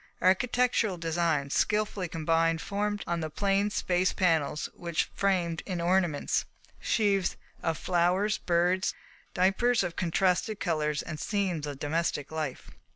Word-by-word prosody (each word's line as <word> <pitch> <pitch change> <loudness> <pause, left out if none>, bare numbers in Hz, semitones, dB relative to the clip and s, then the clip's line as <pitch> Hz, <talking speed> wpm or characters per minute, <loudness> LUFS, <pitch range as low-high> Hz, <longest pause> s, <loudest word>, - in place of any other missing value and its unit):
Architectural 225 +1 +2
designs 165 -4 0
skilfully 210 -3 0
combined 165 0 +1
formed 205 +2 -2
on 170 -1 -1
the 160 -1 -3
plain 200 +4 +1
spaces 185 -2 +1
panels 160 -5 +1
which 170 -2 -2
framed 175 -4 0
in 185 -3 -2
ornaments, 175 -3 +1 0.3
sheaves 200 -4 +1 0.2
of 165 -2 -1
flowers, 185 +4 +1
birds, 180 +1 +1 0.4
diapers 195 +6 +3
of 175 -2 -4
contrasted 185 +4 +1
colours, 150 -3 0
and 155 -2 -6
scenes 185 -8 -1
of 145 -2 -5
domestic 150 -1 -1
life. 155 -4 -4
175 Hz, 125 wpm, -29 LUFS, 165-195 Hz, 0.4 s, diapers